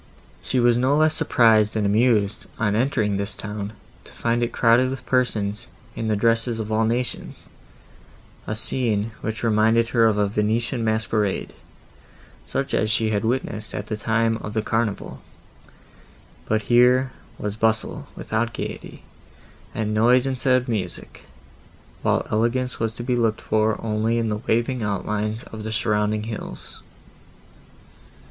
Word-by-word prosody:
She 125 +7 -1
was 120 0 +4
no 130 +3 +3
less 155 0 +4
surprised 110 -7 +3
and 110 -2 +1
amused, 105 -1 +2
on 105 -2 +1
entering 110 -4 +1
this 100 +2 -3
town, 105 0 -5 0.3
to - - -16
find 120 0 -1
it 120 - 0
crowded 120 +2 +4
with 135 0 -6
persons 115 -3 0 0.3
in 115 - -3
the 110 - +2
dresses 115 +2 +1
of 110 0 -4
all 110 +1 +2
nations; 120 +3 -3 1.0
a 105 - -2
scene, 110 -2 0
which 110 +2 -4
reminded 115 +1 +3
her 115 -2 +4
of 110 -2 +1
a 105 -1 +2
Venetian 115 +4 0
masquerade, 110 -2 0 0.9
such 135 - -2
as 110 - +1
she 110 -1 +2
had 105 -1 0
witnessed 110 -2 -2
at 100 - -4
the 110 - -3
time 115 +1 +1
of 105 -1 -7
the 110 - +1
Carnival; 110 -2 -2 1.3
but 110 -1 +1
here 125 +2 +4 0.3
was 105 0 -4
bustle 110 0 0
without 115 +1 -2
gaiety, - - -6 0.7
and 110 -1 -1
noise 120 +4 +4
instead 130 -1 +2
of 125 - -10
music, 100 -7 -4 0.8
while - - +1
elegance 120 +4 0
was 115 0 -1
to 120 - -6
be 125 0 0
looked 115 -2 +1
for 110 0 +1
only 110 +1 0
in 115 -1 0
the 105 0 -2
waving 120 +2 +1
outlines 105 +2 -2
of 110 - -9
the 110 +1 -4
surrounding 105 -2 0
hills. 110 -1 -7
110 Hz, 150 wpm, -23 LUFS, 105-120 Hz, 1.3 s, was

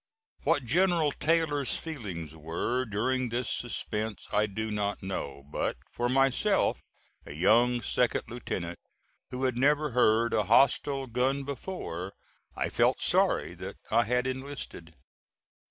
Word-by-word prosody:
What 130 - +1
General 170 +2 +3
Taylor's 150 -3 +1
feelings 95 - -6
were 85 +11 -2
during 125 +4 0
this 120 +1 -2
suspense 110 -3 -3
I 105 +1 +3
do 110 +2 -4
not 105 -1 -2
know; 70 -8 -4
but - - -1
for 120 0 -1
myself, 135 0 +2 0.4
a 70 - -9
young 120 +8 +4
second 125 -2 +1
lieutenant 95 -7 -5 0.5
who 125 +1 -4
had 130 -2 +1
never 150 +2 +3
heard 115 -1 +3
a 105 - +2
hostile 135 +3 +3
gun 130 +3 0
before, 130 - -5 0.4
I - - -1
felt - - +2
sorry - - +2
that - - -8
I 115 +1 +4
had 125 +3 +1
enlisted. 130 - -6
120 Hz, 130 wpm, -29 LUFS, 105-135 Hz, 0.5 s, young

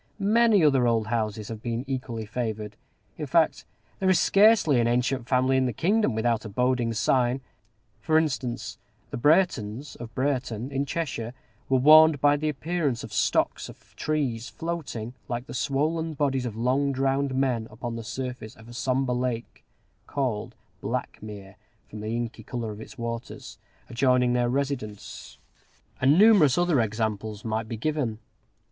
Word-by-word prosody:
Many 215 -1 +4
other 135 -4 +4
old 115 -2 +2
houses 110 -2 -2
have 110 -2 -6
been 120 +1 -3
equally 125 -4 -4
favored: 110 -2 -4 0.4
in - - -3
fact, - - +2 0.3
there 190 - +2
is 185 - +4
scarcely 195 - +5
an 120 - +2
ancient 125 +1 0
family 130 0 +2
in 130 -1 +2
the 125 - -2
kingdom 185 - +1
without 115 0 0
a 110 - -7
boding 125 +2 +1
sign. 125 +3 +1 0.6
For 160 -1 +2
instance, 130 -6 -2 0.3
the - - -3
Breretons 140 - +1
of 120 -1 -8
Brereton, 130 -2 -2
in 140 +1 -1
Cheshire, 130 -7 -3 0.3
were 135 - +4
warned 155 +2 +7
by 145 +1 +4
the 155 +1 -1
appearance 150 -3 -2
of 110 -1 -9
stocks 110 - +1
of - - -16
trees 130 -7 -2
floating, 150 -9 -5
like 120 +1 -3
the - - -9
swollen 155 +5 -1
bodies 135 -3 0
of 110 - -6
long 130 +5 +1
drowned 135 0 0
men, 125 -4 0
upon 115 +2 -6
the 115 - -5
surface 125 -2 -6
of 110 +1 -16
a 120 - -11
sombre 130 +1 0
lake 125 -2 -3 0.4
called 125 -7 -2 0.3
Blackmere, 100 -2 -6 0.3
from 105 - -9
the 110 +2 -3
inky 120 -1 -4
color 115 0 -5
of 105 +1 -9
its 135 - -11
waters 115 0 -6 0.3
adjoining 125 0 +2
their 120 -1 +1
residence; 130 -6 -4 0.6
and 140 +4 +5
numerous 200 - +6
other 175 -7 +3
examples 110 -1 -3
might 110 0 -2
be 115 - -4
given. 140 -4 -1
125 Hz, 155 wpm, -26 LUFS, 115-140 Hz, 0.6 s, warned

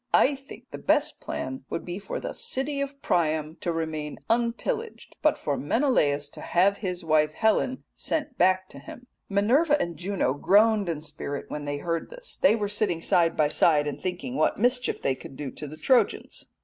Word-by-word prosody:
I 285 - +5
think 270 0 -12
the - - -6
best - - +1
plan 130 0 -5
would - - -4
be 175 +2 -5
for 200 - -5
the - - -5
City 280 - -2
of 280 0 -4
Priam 155 -1 0
to 175 - -2
remain 160 -2 -3
unpillaged, 240 - -2
but 305 - +3
for 145 -2 -2
Menelaus 150 - +1
to - - -11
have 195 +3 +2
his 180 -3 -4
wife 155 -1 +3
Helen 220 +7 +1
sent 300 -4 -3
back 185 -1 +3
to - - -10
him.' 245 - -11 0.2
"Minerva 265 +10 +3
and 170 - -2
Juno 180 -7 0
groaned 205 +5 +4
in 155 -3 -2
spirit 145 -2 -5
when 150 -1 -4
they 145 0 -2
heard 165 +2 -3
this. - - -6
They 275 - +5
were 210 -2 -1
sitting 200 -5 -1
side 170 -1 +3
by 150 -2 +3
side, 150 -1 +3
and 145 - -4
thinking 185 +8 -4
what - - +2
mischief 245 +2 +1
they 135 - +2
could 130 - -11
do 140 -1 -5
to 150 - -8
the 155 +2 -9
Trojans. 255 - +1
185 Hz, 190 wpm, -26 LUFS, 155-245 Hz, 0.2 s, I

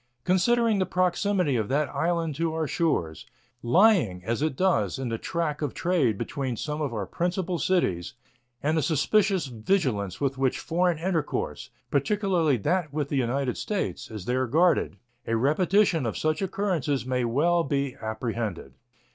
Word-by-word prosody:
Considering 220 +4 +2
the 185 - +2
proximity 185 -3 +1
of 110 -3 0
that 145 +2 +1
island 165 -2 -1
to 160 +2 -2
our 160 -1 0
shores, 125 - -1 0.3
lying, 140 - +3
as 115 +4 -1
it 155 -3 0
does, 130 - +1
in 130 -2 -3
the 115 - -2
track 160 -3 -2
of 145 -3 -2
trade 150 - +1
between 130 -1 -3
some 150 +4 -3
of 145 -4 -1
our 105 -4 -3
principal 175 - -2
cities, 125 - 0 0.5
and 155 +2 +1
the 160 - +2
suspicious 190 +5 +2
vigilance 115 - -1
with 135 -1 -1
which 135 -1 +1
foreign 175 0 0
intercourse, 165 -2 -2 0.2
particularly 165 - +1
that 155 - 0
with 145 -1 -2
the - - -2
United 130 0 0
States, 185 - -3
is 105 -4 -7
there 130 +2 0
guarded, 165 +8 +2 0.3
a 115 - +1
repetition 165 - +2
of 110 - -3
such 155 +2 0
occurrences 180 -9 -1
may 125 -1 0
well 165 +9 +2
be 140 -2 -1
apprehended. 110 - -4
150 Hz, 155 wpm, -26 LUFS, 125-180 Hz, 0.5 s, lying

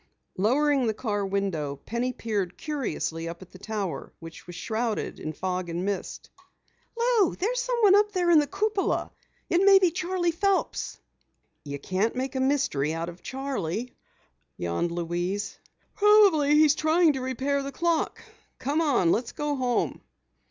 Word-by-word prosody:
Lowering 265 +6 +2
the 220 - 0
car 210 -3 -2
window, 190 -8 -2
Penny 235 - -3
peered 210 -7 -3
curiously 165 - -3
up 170 +2 -8
at 185 - -18
the 185 - -13
tower 205 -4 -4
which 165 +2 -11
was 175 - -8
shrouded 220 +3 -2
in 155 - -4
fog 180 +2 -3
and 170 +2 -3
mist. 200 -1 -4 0.7
"Lou, 470 -6 +3
there's - - -1
someone 475 -6 +3
up 415 +1 +4
there 355 -3 +1
in 325 - +7
the 295 - +1
cupola! 405 +2 -1 0.4
It 345 +1 +2
may 390 0 +8
be 370 -3 +3
Charley 350 0 -1
Phelps!" 390 +3 -1 0.7
"You 140 -1 -5
can't 190 - -1
make 260 +2 -2
a 260 - -2
mystery 260 - +1
out 165 +1 -3
of 175 +1 -12
Charley," 250 -5 -4 0.6
yawned 85 - -1
Louise. 175 +4 -3 0.3
"Probably 400 -9 +5
he's 305 -1 +6
trying 315 0 +3
to 265 - -4
repair 265 +2 -1
the 275 0 -5
clock. 335 +1 -1 0.3
Come 290 +5 0
on, 250 - +3
let's 235 +1 -1
get - - -5
home." 260 -5 0
255 Hz, 155 wpm, -26 LUFS, -, 0.7 s, may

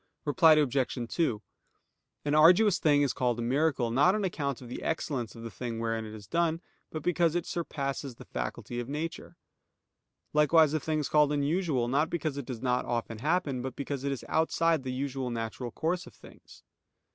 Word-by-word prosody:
Reply 160 +2 +6
Obj. 140 -4 +1 0.2
2: 125 -11 +1 0.8
An 145 - 0
arduous 180 +6 +6
thing 145 -2 +4
is 140 - +1
called 125 -2 0
a 120 - -3
miracle, 135 -1 +1
not 145 - +4
on 215 - -1
account 140 -8 -2
of 125 - -11
the 120 - -6
excellence 135 -8 -2
of 115 - -10
the 115 - -6
thing 115 +2 -5
wherein 115 -1 -2
it 110 0 -8
is 105 -2 -11
done, 165 - 0 0.3
but 155 -2 -6
because 170 -2 +2
it 175 - 0
surpasses 140 -5 -4
the - - -12
faculty 65 - -5
of 120 +1 -5
nature: 155 +3 -5 1.0
likewise 150 0 +5
a 155 - +1
thing 155 +1 -1
is 150 - -1
called 150 -1 +4
unusual, 145 -3 0
not 145 +6 +1
because 155 -4 -2
it 140 -3 -6
does 125 -2 -6
not 125 -1 +1
often 115 -2 -3
happen, 150 -2 0
but 130 0 -5
because 140 -1 -4
it 140 - -1
is 135 - -5
outside 160 0 +2
the 130 -1 -4
usual 130 0 -3
natural 115 +1 -4
course 170 +9 -2
of - - -14
things. - - -16
140 Hz, 190 wpm, -29 LUFS, 125-160 Hz, 1.0 s, Reply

